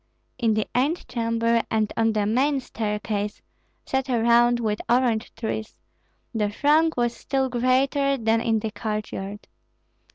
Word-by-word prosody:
In 225 Hz, -3 st, +2 dB
the 215 Hz, -, 0 dB
antechamber 230 Hz, -5 st, +1 dB
and 215 Hz, -1 st, 0 dB
on 225 Hz, -1 st, +2 dB
the 210 Hz, -1 st, +1 dB
main 270 Hz, +6 st, +2 dB
staircase, 210 Hz, -3 st, -3 dB, 0.5 s
set 265 Hz, 0 st, -1 dB
around 240 Hz, 0 st, +4 dB
with 215 Hz, -2 st, -1 dB
orange 240 Hz, -2 st, +2 dB
trees, 220 Hz, -1 st, -4 dB, 0.6 s
the 210 Hz, -2 st, 0 dB
throng 300 Hz, +8 st, +3 dB
was 240 Hz, -1 st, +1 dB
still 265 Hz, -1 st, -1 dB
greater 270 Hz, +3 st, +2 dB
than 225 Hz, -1 st, +1 dB
in 225 Hz, -1 st, +1 dB
the 220 Hz, 0 st, -3 dB
courtyard. 210 Hz, -2 st, -5 dB
230 Hz, 130 wpm, -24 LUFS, 220-255 Hz, 0.6 s, around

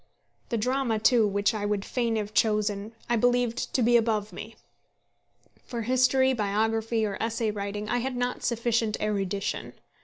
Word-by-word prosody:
The 235 Hz, -, 0 dB
drama, 250 Hz, 0 st, 0 dB
too, 220 Hz, 0 st, +4 dB
which 200 Hz, +2 st, +1 dB
I 215 Hz, -2 st, -3 dB
would 205 Hz, -1 st, -1 dB
fain 235 Hz, -3 st, -1 dB
have 210 Hz, -1 st, -3 dB
chosen, 210 Hz, -1 st, +1 dB
I 240 Hz, -, +2 dB
believed 245 Hz, 0 st, +1 dB
to 255 Hz, -, +3 dB
be 240 Hz, +1 st, +5 dB
above 215 Hz, -3 st, 0 dB
me. 215 Hz, +5 st, -8 dB, 1.1 s
For 235 Hz, -2 st, -5 dB
history, 255 Hz, +2 st, +3 dB
biography, 220 Hz, +1 st, 0 dB
or 200 Hz, -2 st, -4 dB
essay 225 Hz, -1 st, -1 dB
writing 205 Hz, 0 st, -4 dB
I 245 Hz, -, 0 dB
had 260 Hz, +1 st, -3 dB
not 245 Hz, 0 st, -2 dB
sufficient 230 Hz, -2 st, 0 dB
erudition. 200 Hz, -2 st, -2 dB
225 Hz, 155 wpm, -27 LUFS, 210-240 Hz, 1.1 s, be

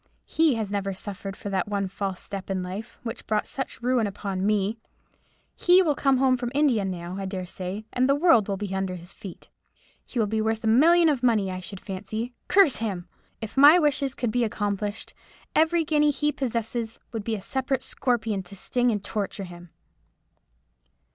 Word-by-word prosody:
He 315 Hz, -5 st, +2 dB
has 215 Hz, -3 st, -3 dB
never 195 Hz, -1 st, -1 dB
suffered 195 Hz, 0 st, -6 dB
for 205 Hz, -, -6 dB
that 190 Hz, -1 st, 0 dB
one 200 Hz, -1 st, -1 dB
false 195 Hz, -1 st, -4 dB
step 195 Hz, -1 st, -7 dB
in 190 Hz, -1 st, -1 dB
life, 190 Hz, +5 st, -7 dB
which 230 Hz, 0 st, -6 dB
brought 215 Hz, -1 st, +1 dB
such 265 Hz, -3 st, -6 dB
ruin 245 Hz, -3 st, +2 dB
upon 195 Hz, -1 st, -4 dB
me. 210 Hz, +2 st, +1 dB, 0.8 s
He 365 Hz, +1 st, +5 dB
will 310 Hz, -4 st, +2 dB
come 275 Hz, -1 st, +2 dB
home 260 Hz, -1 st, +3 dB
from 245 Hz, -1 st, -3 dB
India 275 Hz, -8 st, +3 dB
now, 180 Hz, -1 st, -4 dB
I 195 Hz, -, -3 dB
dare 190 Hz, -1 st, -4 dB
say, 185 Hz, +4 st, -6 dB
and 255 Hz, +2 st, +2 dB
the 275 Hz, -, +5 dB
world 290 Hz, -, +4 dB
will 200 Hz, -1 st, -1 dB
be 200 Hz, -1 st, -4 dB
under 190 Hz, -1 st, -2 dB
his 175 Hz, 0 st, -11 dB
feet. 190 Hz, -4 st, -11 dB, 0.5 s
He -, -, -9 dB
will 225 Hz, -, +3 dB
be 220 Hz, +1 st, -1 dB
worth 220 Hz, +1 st, -1 dB
a -, -, 0 dB
million 330 Hz, +9 st, +6 dB
of 285 Hz, -5 st, +2 dB
money, 220 Hz, -6 st, +2 dB
I 185 Hz, -, -4 dB
should 185 Hz, +1 st, -8 dB
fancy; 215 Hz, +5 st, -5 dB
curse 370 Hz, -8 st, +5 dB
him! 195 Hz, -6 st, -3 dB, 0.3 s
If 220 Hz, -1 st, -6 dB
my 290 Hz, +5 st, +9 dB
wishes 285 Hz, -4 st, +1 dB
could 240 Hz, -3 st, -1 dB
be 245 Hz, +2 st, +1 dB
accomplished, 205 Hz, -1 st, -2 dB, 0.4 s
every 325 Hz, +1 st, +3 dB
guinea 300 Hz, -1 st, +3 dB
he 295 Hz, +1 st, +1 dB
possesses 230 Hz, -3 st, -3 dB
would 225 Hz, -3 st, -4 dB
be 225 Hz, +1 st, -1 dB
a -, -, -5 dB
separate 265 Hz, +4 st, -2 dB
scorpion 230 Hz, -6 st, -1 dB
to 185 Hz, +2 st, -11 dB
sting 245 Hz, +5 st, +1 dB
and 210 Hz, -3 st, -1 dB
to 200 Hz, -, -6 dB
torture 205 Hz, -2 st, -3 dB
him." 175 Hz, -1 st, -11 dB
220 Hz, 195 wpm, -26 LUFS, 195-260 Hz, 0.8 s, my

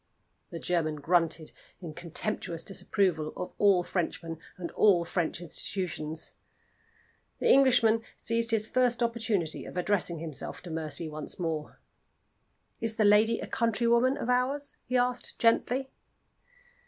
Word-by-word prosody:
The 170 Hz, -, -6 dB
German 165 Hz, -3 st, 0 dB
grunted 165 Hz, +1 st, 0 dB, 0.3 s
in 170 Hz, -4 st, -7 dB
contemptuous 170 Hz, 0 st, -4 dB
disapproval 185 Hz, -5 st, -1 dB
of 180 Hz, -, -4 dB
all 195 Hz, -3 st, +5 dB
Frenchmen, 165 Hz, -2 st, -3 dB, 0.2 s
and 175 Hz, -2 st, -5 dB
all 185 Hz, -5 st, +4 dB
French 170 Hz, -1 st, -1 dB
institutions. 165 Hz, -2 st, -3 dB, 1.1 s
The -, -, +3 dB
Englishman 240 Hz, -4 st, +5 dB, 0.2 s
seized 230 Hz, 0 st, 0 dB
his 220 Hz, -2 st, +1 dB
first 245 Hz, -1 st, +2 dB
opportunity 225 Hz, -8 st, -1 dB
of -, -, -9 dB
addressing 180 Hz, -2 st, +1 dB
himself 155 Hz, -3 st, -5 dB
to 175 Hz, -, -8 dB
Mercy 160 Hz, 0 st, -2 dB
once 155 Hz, -1 st, -4 dB
more. 160 Hz, -4 st, -4 dB, 1.0 s
"Is 225 Hz, -1 st, -2 dB
the 215 Hz, -, +2 dB
lady 215 Hz, +3 st, +4 dB
a -, -, -4 dB
countrywoman 235 Hz, +2 st, +2 dB
of -, -, -4 dB
ours?" 260 Hz, +3 st, 0 dB
he 255 Hz, 0 st, +1 dB
asked, 250 Hz, 0 st, -1 dB
gently. 250 Hz, +3 st, +2 dB
195 Hz, 130 wpm, -29 LUFS, 165-230 Hz, 1.1 s, all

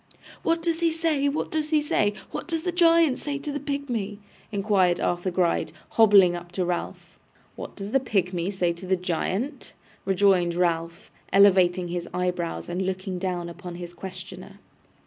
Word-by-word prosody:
'What 330 Hz, 0 st, 0 dB
does 330 Hz, -1 st, 0 dB
he 335 Hz, -1 st, +2 dB
say, 315 Hz, -3 st, +1 dB
what 290 Hz, -, -3 dB
does 310 Hz, -1 st, -1 dB
he 310 Hz, -1 st, +4 dB
say? 210 Hz, -8 st, +1 dB, 0.2 s
What -, -, -5 dB
does 325 Hz, -2 st, -2 dB
the 360 Hz, -, -1 dB
giant 330 Hz, -5 st, +4 dB
say 285 Hz, -1 st, -3 dB
to 290 Hz, +1 st, -5 dB
the 285 Hz, -, -3 dB
pigmy?' 255 Hz, -8 st, -3 dB, 0.3 s
inquired 195 Hz, -4 st, +2 dB
Arthur 175 Hz, +1 st, 0 dB
Gride, 175 Hz, -3 st, 0 dB, 0.2 s
hobbling 200 Hz, -5 st, +6 dB
up 175 Hz, 0 st, -8 dB
to 180 Hz, 0 st, -1 dB
Ralph. 175 Hz, 0 st, -5 dB, 0.4 s
'What -, -, -8 dB
does 200 Hz, 0 st, -6 dB
the 270 Hz, -, +4 dB
pigmy 185 Hz, -7 st, -1 dB
say 180 Hz, -3 st, 0 dB
to 170 Hz, +2 st, -10 dB
the 190 Hz, -, +3 dB
giant?' 190 Hz, -, -3 dB, 0.3 s
rejoined 190 Hz, -3 st, +3 dB
Ralph, 170 Hz, 0 st, -1 dB, 0.2 s
elevating 185 Hz, -3 st, +5 dB
his 175 Hz, 0 st, -4 dB
eyebrows 180 Hz, -2 st, -2 dB
and 175 Hz, +2 st, -2 dB
looking 185 Hz, 0 st, -3 dB
down 180 Hz, -2 st, -2 dB
upon 175 Hz, +1 st, -8 dB
his 175 Hz, 0 st, -8 dB
questioner. 185 Hz, +1 st, -9 dB
190 Hz, 165 wpm, -25 LUFS, 175-280 Hz, 0.4 s, hobbling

